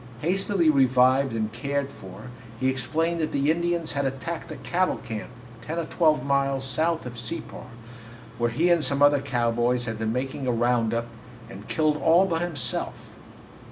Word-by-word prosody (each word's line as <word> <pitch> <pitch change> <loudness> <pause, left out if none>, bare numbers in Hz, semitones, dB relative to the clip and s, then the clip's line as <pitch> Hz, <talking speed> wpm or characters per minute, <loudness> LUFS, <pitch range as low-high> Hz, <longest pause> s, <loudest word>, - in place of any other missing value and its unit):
Hastily 190 +1 +1
revived 130 -2 +4
and 110 -1 -2
cared 140 +3 -2
for, 105 +6 -11 0.3
he 130 - +2
explained 160 +6 -1
that 155 - -1
the 140 +2 +2
Indians 170 0 -1
had 140 0 -1
attacked 135 +6 -4
the 155 - -7
cattle 185 +4 0
camp, 110 -4 -6 0.3
ten 155 +8 -5
or 170 - -1
twelve 155 -5 +2
miles 140 -1 +1
south 160 +5 0
of 120 -1 -7
Separ, 125 +2 -7 0.7
where 120 0 +2
he 165 +9 +2
and 170 -3 +3
some 140 0 +1
other 145 -1 +5
cowboys 120 -1 0
had 110 -1 -4
been 110 0 -1
making 130 +2 -3
a - - +2
round 120 -1 +1
up, 115 0 -1 0.5
and 105 -1 -10
killed 155 -1 +1
all 170 +5 +4
but 165 -3 -1
himself. 170 -6 -3
140 Hz, 170 wpm, -25 LUFS, 120-160 Hz, 0.7 s, other